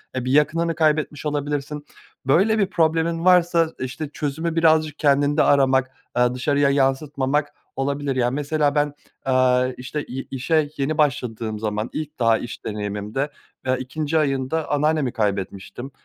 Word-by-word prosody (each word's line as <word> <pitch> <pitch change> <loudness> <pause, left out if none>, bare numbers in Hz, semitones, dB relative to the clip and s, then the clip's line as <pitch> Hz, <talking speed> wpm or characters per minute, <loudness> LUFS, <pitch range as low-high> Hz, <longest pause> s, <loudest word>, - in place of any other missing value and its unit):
eee, 130 -1 -2
bir 130 - -1
yakınını 165 +3 +2
kaybetmiş 155 -2 0
olabilirsin. 145 0 -3 0.4
Böyle 200 +11 +3
bir 200 - +4
problemin 165 -1 +1
varsa, 175 -2 +4
işte, 135 +3 -4
çözümü 160 +3 -3
birazcık 155 -2 +3
kendinde 145 0 +3
aramak, 130 -2 +3 0.2
aaa, 125 0 +3
dışarıya 140 +2 +2
yansıtmamak 140 +1 0 0.2
olabilir. 140 0 -1
Yani, 125 +1 +1
mesela, 145 0 0
ben, 145 0 +1 0.3
aaa, 130 -1 +3
işte, 135 +4 -5
ye 130 +2 -5
işe 145 +3 +1
yeni 140 +3 -1
başladığım 115 -7 -1
zaman 105 +1 -2
ilk 155 -1 -5
daha 115 -2 +4
iş 120 - -8
deneyimimde, 105 +6 -3 0.4
aaa, 130 - +2
2'nci 150 +4 -2
ayında 140 +2 -1
anneannemi 150 -3 +1
kaybetmiştim. 100 +4 -3
145 Hz, 140 wpm, -22 LUFS, 130-155 Hz, 0.4 s, bir